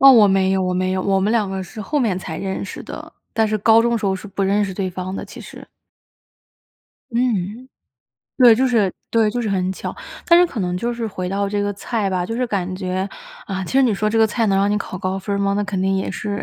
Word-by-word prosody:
哦， 270 0 +10
我 215 -4 +7
没 190 -1 +3
有， 190 -1 +1
我 180 0 0
没 185 0 0
有。 185 0 -1
我 195 0 +2
们 205 - +1
两 220 -4 +1
个 190 0 -3
是 215 +5 -9
后 290 +9 -1
面 215 -8 +1
才 160 -4 -6
认 195 0 -3
识 - - -7
的， - - -9 0.2
但 220 -1 +2
是 215 0 0
高 225 +2 +5
中 235 0 +1
时 215 - -6
候 190 - +1
是 190 +2 -7
不 200 0 -3
认 200 +2 +2
识 195 - -4
对 190 -1 -2
方 185 +1 -5
的 - - -5
其 - - -11
实。 - - -11 1.4
嗯， 235 -1 -1 0.7
对， 245 -3 +8
就 260 +4 +2
是 220 -7 +2 0.2
对， 225 -2 +3
就 245 - -2
是 225 - -2
很 190 -1 0
巧。 - - -6 0.3
但 340 0 +7
是 355 - +7
可 300 -10 -5
能 180 -2 -1
就 235 +6 -1
是 235 -1 -3
回 185 -3 -4
到 200 +1 -1
这 205 0 -1
个 205 0 -1
菜 205 0 -2
吧， 180 -1 -1
就 225 - -4
是 250 +1 0
感 185 -4 -2
觉， 185 +1 -2 0.4
啊， 190 -1 -3
其 - - -7
实 270 0 +5
你 230 -5 +3
说 215 +2 0
这 225 - +1
个 220 - +6
菜 225 +1 0
能 195 -1 +2
让 200 - +3
你 205 - +1
考 190 -2 -5
高 185 +1 -2
分 200 +1 -3
儿 - - -2
吗？ 200 0 +1
那 205 - 0
肯 200 -2 -2
定 190 +1 +1
也 190 - -2
是 205 -1 -4
200 Hz, 290 characters per minute, -20 LUFS, 190-225 Hz, 1.4 s, 哦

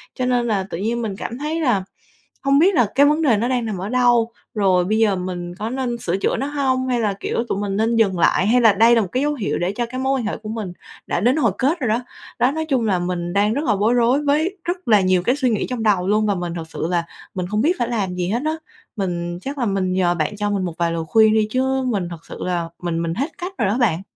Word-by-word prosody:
Cho 255 - -1
nên 245 -1 +1
là 205 -4 0
tự - - -4
nhiên 230 +5 -1
mình 215 -4 -3
cảm 235 - -5
thấy 305 +4 -2
là 240 -10 +2 0.6
hông 275 +1 +4
biết 370 +4 +4
là 245 -6 +4
cái 280 +2 +6
vấn 300 +2 +3
đề 255 -9 +3
nó 230 +4 0
đang 250 -2 0
nằm 215 -3 -3
ở 190 +3 -4
đâu, 240 -2 +3 0.2
rồi 185 -4 +3
bây 215 +4 +1
giờ 215 -3 +3
mình 180 -1 -5
có 215 +4 -4
nên 250 -1 -2
sửa 185 -5 -2
chữa - - 0
nó 275 - -2
hông 265 -3 0
hay 250 -2 +1
là, 210 -3 +1
kiểu, 230 - -1
tụi 195 - -1
mình 200 -1 -2
nên 225 +2 +1
dừng 195 -5 +2
lại, 185 +3 +3
hay 245 +3 +4
là 225 -3 +6
đây 230 +4 +5
là 230 - +4
một 200 - -2
cái 255 - 0
dấu 295 0 +1
hiệu 225 -8 -2
để 175 +2 0
cho 240 +3 -2
cái 255 +2 -6
mối 265 0 +1
quan 235 - -3
hệ 210 - -2
của 215 - -9
mình 215 -5 -4 0.3
đã - - 0
đến 245 +8 +3
hồi 240 -9 +3
kết 300 +7 +1
rồi 255 - -1
đó. 220 +2 +2 0.4
Đó, 250 - +3
nói 315 +2 -3
chung 265 -7 0
là 190 -3 +1
mình 175 -1 -3
đang 205 +2 +2
rất 290 +6 -2
là 220 -6 +2
bối 210 +4 +2
rối 245 +4 +2
với 310 +7 +1
rất 355 +1 -4
là 210 -3 +5
nhiều 185 -1 +2
cái 245 +7 +2
suy 265 -3 +1
nghĩ 215 -3 -1
trong 250 -3 -3
đầu 195 -4 +2
luôn 215 +2 +2
và 205 -1 +1
mình 175 -2 -4
thực 165 -1 -6
sự 160 - -3
là 170 -1 +1 0.3
mình 180 -1 -2
không 210 +1 0
biết 320 +8 +3
phải 240 -1 0
làm 200 -6 -2
gì 180 0 -2
hết 235 +5 0
á. 315 - 0 0.4
Mình 175 -3 -3
chắc 275 +5 -5
là 250 - 0
mình 195 -3 0
nhờ 180 -2 +2
bạn 165 +5 -2
cho 205 0 -1
mình 200 -2 -1
một 175 - -4
vài 170 -1 0
lời 165 -1 -2
khuyên 220 +3 +5
đi, 215 -1 +2
chứ 265 +1 0
mình 200 -8 -1
thật 165 -2 -10
sự - - -9
là 175 -2 -2
mình 170 -1 -2
mình 165 0 -2
hết 280 - -3
cách 360 +2 -5
rồi 220 - +1
đó 210 - 0
bạn. 190 -9 +2
220 Hz, 295 wpm, -21 LUFS, 185-255 Hz, 0.6 s, cái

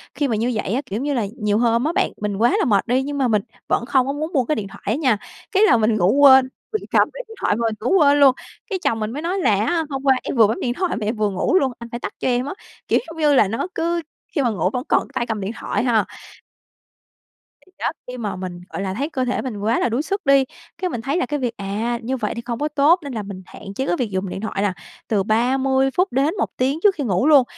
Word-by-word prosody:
Khi 290 - 0
mà 230 - 0
như 230 +4 0
vậy 215 -1 -2
á, 260 - 0
kiểu, 205 -3 -4
giống 245 - -3
như 290 0 0
là, 235 -6 0
nhiều 210 -2 +1
hôm 235 0 +2
á 315 - +1
bạn, - - +1
mình 205 -2 -2
quá 235 +4 +3
là - - +2
mệt 205 -3 +2
đi, 255 +2 +2
nhưng 285 +1 -4
mà 265 -2 +2
mình 215 -3 +2 0.3
vẫn - - 0
không 260 0 +2
có 275 - -1
muốn 310 +4 -4
buông 260 -5 +2
cái 305 - +1
điện 205 -2 -4
thoại 195 - -13
á 210 - +1
nha. 260 -7 +2 0.3
Cái 395 +2 +4
là 425 - +6
mình 220 0 +2
ngủ 185 -1 +3
quên, 265 -2 +8 0.2
mình 430 - -1
cầm - - +4
cái - - -6
điện 450 - -11
thoại - - +2
mà 230 +1 -1
mình 220 - -2
ngủ 250 - +2
quên 290 -2 +5
luôn. 270 -2 +6 0.3
Cái 385 -3 -2
chồng 225 - +1
mình 215 0 -2
mới 285 +5 -5
nói 360 +4 -1
là 225 - +3
á 335 +4 +1
"Hôm 270 -1 -4
qua 270 -1 +5
em - - -3
vừa 225 -4 +6
bấm 220 - -2
điện 240 - 0
thoại 365 +6 -1
mà 215 - -3
em 220 +3 -1
vừa 215 -1 +1
ngủ 195 - 0
luôn, 265 -5 0
anh 235 0 -9
phải 235 - -5
tắt - - -5
cho - - -1
em 250 0 +1
á." 285 - -4 0.3
Kiểu - - +3
giống 325 - -10
như 300 -2 +3
là 235 -7 +5
nó 225 - -2
cứ 340 +1 0 0.3
khi 290 - +2
mà 245 - +2
ngủ 185 -4 0
vẫn 250 - -2
còn - - +3
cái - - -20
tay 235 - -1
cầm 220 -2 -2
điện 195 +2 -3
thoại - - -1
ha. 230 -4 +2 1.6
Thì - - -25
đó, - - 0 0.2
khi 250 0 -6
mà 215 -4 -3
mình, 180 -1 -6
gọi - - -5
là, 190 -1 -2
thấy 275 +9 -2
cơ 260 -5 -1
thể 250 - -1
mình 250 -5 -5
quá 215 +3 +1
là - - +1
đuối 235 +5 0
sức 395 +4 -3
đi, 275 -1 +5 0.3
cái 370 - -2
mình 240 - -4
thấy 275 +8 -1
là 360 - +1
cái 295 0 -2
việc, 240 -3 -3
à, 215 +4 -2
như 260 +3 -2
vậy - - -2
thì 235 - -4
không 235 -1 -3
có 295 - 0
tốt 300 +4 +4
nên 280 -2 -6
là 220 -3 -3
mình 195 -2 -8
hạn 195 - -10
chế 265 - -1
cái 175 - +2
việc 240 - 0
dùng 190 0 -2
điện 190 - -5
thoại 215 -2 -3
là 205 -2 +1 0.3
từ 205 -3 +1
30 265 +5 +2
phút 365 +6 +1
đến 275 +5 +1
1 - - 0
tiếng 270 +4 0
trước 405 -2 +5
khi 290 - -3
ngủ 205 +2 +1
luôn. 290 -4 +7
250 Hz, 300 wpm, -21 LUFS, 215-285 Hz, 1.6 s, quên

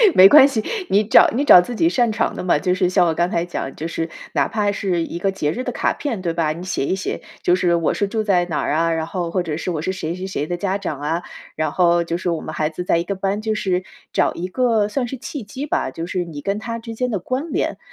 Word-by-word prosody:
没 185 - +10
关 275 +5 +8
系， 225 -6 -2 0.3
你 205 +2 +4
找 210 - +6
你 285 +3 +1
找 180 - +9
自 240 +7 -6
己 330 +8 +3
擅 240 -9 +2
长 - - -1
的 - - -5
嘛。 180 -4 +3
就 180 +4 0
是 180 -1 +1
像 180 - +3
我 165 - +1
刚 175 +2 0
才 170 -1 -1
讲 170 -5 -5
就 160 - -4
是 165 0 -3 0.2
哪 - - +2
怕 210 -2 0
是 180 -4 -1
一 170 - -6
个 195 +2 0
节 150 -6 -1
日 250 - -4
的 250 - -3
卡 - - 0
片， 260 -8 -3
对 170 -1 -1
吧？ 165 -2 0
你 170 +3 -8
写 185 -6 -2
一 190 - +1
写， 190 - -4 0.2
就 175 - +4
是 175 -2 +2
我 165 -2 +1
是 205 - 0
住 220 +1 -2
在 180 -4 +2
哪 165 -4 -2
儿 - - -1
啊， 165 +1 +2
然 160 -1 -1
后 175 0 -3
或 180 +1 -1
者 160 -3 -3
是 170 - -4
我 160 -4 -2
是 185 - -1
谁 170 -2 -4
谁 185 +1 -6
谁 155 -6 -3
的 175 - -3
家 195 +1 -1
长 155 -8 -4
啊， 160 +4 -1 0.3
然 155 -1 -1
后 175 -1 +3
就 170 0 -2
是 180 0 -2
我 165 - -2
们 155 - -7
孩 155 0 0
子 180 +3 -5
在 170 - +2
一 170 - 0
个 200 - -3
班 195 +1 -2
就 220 0 -1
是 185 -4 -1 0.3
找 - - +1
一 180 +2 -4
个 225 0 +1
算 245 +2 -1
是 265 - -5
契 265 +1 -7
机 260 +8 -6
吧， 130 - -1
就 165 +5 -6
是 180 -1 -2
你 155 -4 -8
跟 200 +6 -1
他 230 +1 -5
之 230 0 -8
间 250 +1 -1
的 205 - -1
关 260 - -3
联。 - - -1
185 Hz, 310 characters per minute, -20 LUFS, 170-215 Hz, 0.3 s, 没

